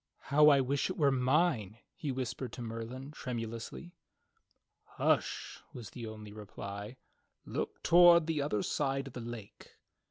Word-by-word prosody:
"How 150 Hz, +1 st, +8 dB
I 140 Hz, -2 st, +6 dB
wish 140 Hz, +5 st, 0 dB
it 185 Hz, -, -4 dB
were 145 Hz, -4 st, +4 dB
mine," 130 Hz, -, +1 dB, 0.2 s
he 150 Hz, -6 st, -4 dB
whispered 130 Hz, 0 st, -4 dB
to 125 Hz, -, -6 dB
Merlin 115 Hz, +4 st, -6 dB
tremu 120 Hz, -6 st, -4 dB
lously. 115 Hz, +9 st, -7 dB, 1.1 s
"Hush," -, -, 0 dB
was 115 Hz, -4 st, -8 dB
the 115 Hz, -2 st, -7 dB
only 105 Hz, -1 st, -9 dB
reply, 105 Hz, +2 st, -7 dB, 0.5 s
"Look -, -, -4 dB
toward 170 Hz, -1 st, +7 dB
the 160 Hz, -2 st, 0 dB
other 105 Hz, -8 st, 0 dB
side 135 Hz, -1 st, -1 dB
of 135 Hz, -, -9 dB
the 125 Hz, -, -6 dB
lake." 115 Hz, -3 st, -9 dB
130 Hz, 150 wpm, -32 LUFS, 115-145 Hz, 1.1 s, How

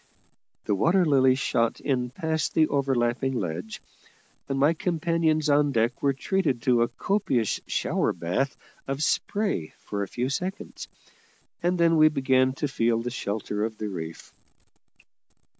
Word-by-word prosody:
The -, -, +1 dB
Water 170 Hz, -, +3 dB
Lily 130 Hz, -4 st, +4 dB
shot 115 Hz, -3 st, 0 dB
in 125 Hz, -3 st, -1 dB
past 160 Hz, +4 st, -2 dB
the 155 Hz, -1 st, +4 dB
overlapping 135 Hz, -2 st, 0 dB
ledge; 90 Hz, -1 st, -4 dB, 0.7 s
and 135 Hz, -, -1 dB
my 145 Hz, +4 st, +4 dB
companions 165 Hz, -2 st, 0 dB
on 145 Hz, 0 st, +3 dB
deck 115 Hz, 0 st, 0 dB
were 140 Hz, -, +3 dB
treated 140 Hz, -, -1 dB
to 125 Hz, -2 st, +3 dB
a 120 Hz, -, +3 dB
copious 135 Hz, -, 0 dB
shower -, -, 0 dB
bath 125 Hz, +12 st, -2 dB, 0.3 s
of 135 Hz, +2 st, -2 dB
spray 195 Hz, -, -1 dB
for 100 Hz, -, -5 dB
a 100 Hz, -, -2 dB
few 125 Hz, +6 st, -2 dB
seconds, 180 Hz, +7 st, -4 dB, 0.7 s
and 180 Hz, +1 st, +1 dB
then 165 Hz, -1 st, +4 dB
we 155 Hz, 0 st, +7 dB
began 130 Hz, -3 st, +2 dB
to 145 Hz, +3 st, -2 dB
feel 115 Hz, -4 st, +1 dB
the 120 Hz, -, -3 dB
shelter 105 Hz, -3 st, -3 dB
of 110 Hz, 0 st, -3 dB
the 105 Hz, -, -4 dB
reef. 80 Hz, -4 st, -7 dB
135 Hz, 145 wpm, -26 LUFS, 115-155 Hz, 0.7 s, we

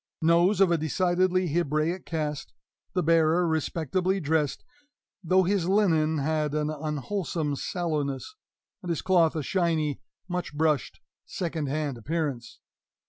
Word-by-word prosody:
Nose 170 Hz, +5 st, +4 dB
of 190 Hz, -3 st, +5 dB
a 170 Hz, -, +2 dB
decidedly 180 Hz, +3 st, +1 dB
Hebraic 165 Hz, +2 st, 0 dB
cast 150 Hz, -, -3 dB, 0.4 s
the 180 Hz, 0 st, +1 dB
bearer 165 Hz, +2 st, +3 dB
respectably 165 Hz, +4 st, 0 dB
dressed, 150 Hz, -3 st, 0 dB, 0.6 s
though 185 Hz, +2 st, +4 dB
his 185 Hz, -1 st, 0 dB
linen 165 Hz, -6 st, +3 dB
had 150 Hz, 0 st, 0 dB
an 150 Hz, 0 st, 0 dB
unwholesome 155 Hz, +1 st, -2 dB
sallowness, 150 Hz, -, -3 dB, 0.5 s
and 180 Hz, -, -7 dB
his 165 Hz, -, -1 dB
cloth 175 Hz, -4 st, +3 dB
a 155 Hz, -, -2 dB
shiny, 160 Hz, -4 st, 0 dB, 0.3 s
much 180 Hz, -4 st, -4 dB
brushed, 155 Hz, -3 st, 0 dB, 0.3 s
second 160 Hz, -5 st, -3 dB
hand 145 Hz, -3 st, -2 dB
appearance. 145 Hz, -2 st, -3 dB
160 Hz, 125 wpm, -27 LUFS, 150-180 Hz, 0.6 s, of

